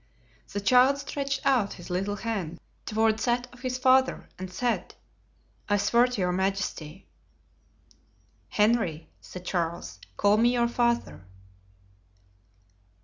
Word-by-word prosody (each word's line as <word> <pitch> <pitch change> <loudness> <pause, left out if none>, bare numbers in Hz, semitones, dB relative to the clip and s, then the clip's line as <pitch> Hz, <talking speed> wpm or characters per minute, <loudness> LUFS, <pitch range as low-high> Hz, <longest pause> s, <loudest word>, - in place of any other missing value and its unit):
The 205 - -2
child 255 +6 +5
stretched 275 -1 -3
out 250 -7 +2
his 175 0 -10
little 195 +3 -1
hand 195 -7 -4 0.3
toward 220 0 +2
that 245 +1 0
of 250 - -15
his 255 0 -3
father 260 0 +3
and 185 0 -6
said, 240 +5 -2 0.7
"I 205 - +3
swear 235 +5 +3
to 245 -5 -3
your 180 0 +1
majesty." 190 -3 -3 1.4
"Henry," 210 -7 +1
said 180 0 -10
Charles, 170 -2 -3 0.2
"call 205 +1 +4
me 240 +2 +4
your 240 -1 +2
father." 235 - -1
220 Hz, 120 wpm, -27 LUFS, 185-250 Hz, 1.4 s, child